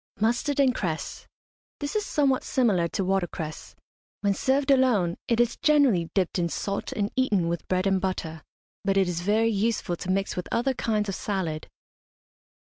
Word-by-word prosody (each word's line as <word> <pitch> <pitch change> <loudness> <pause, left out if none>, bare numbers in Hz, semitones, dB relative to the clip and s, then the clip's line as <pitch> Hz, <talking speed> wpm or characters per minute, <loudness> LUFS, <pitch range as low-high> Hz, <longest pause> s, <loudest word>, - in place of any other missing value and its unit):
MUSTARD 240 +6 +1
AND 265 -2 +4
CRESS. 165 -8 -4 0.5
This 285 +4 -4
is 425 - +1
somewhat 275 -3 +2
similar 205 -10 +2
to 190 +3 -2
watercress. 175 -4 -3 0.5
When 200 -1 +2
served 270 +6 +1
alone 235 -11 +3
it 235 -1 +1
is 240 -1 +2
generally 275 - +3
dipped 185 -2 +1
in 170 -1 0
salt 200 +4 -3
and 205 0 -2
eaten 210 -10 +2
with 170 0 -3
bread 185 +1 0
and 195 -1 +2
butter, 165 -4 -3 0.4
but 195 0 +1
it 190 -2 +3
is 175 -1 -2
very 215 +4 +2
useful 210 -3 0
to 185 - -6
mix 195 +1 0
with 180 - -4
other 250 +3 +1
kinds 215 -4 -1
of 195 - -2
salad. 175 -6 -3
200 Hz, 170 wpm, -26 LUFS, 180-240 Hz, 0.5 s, AND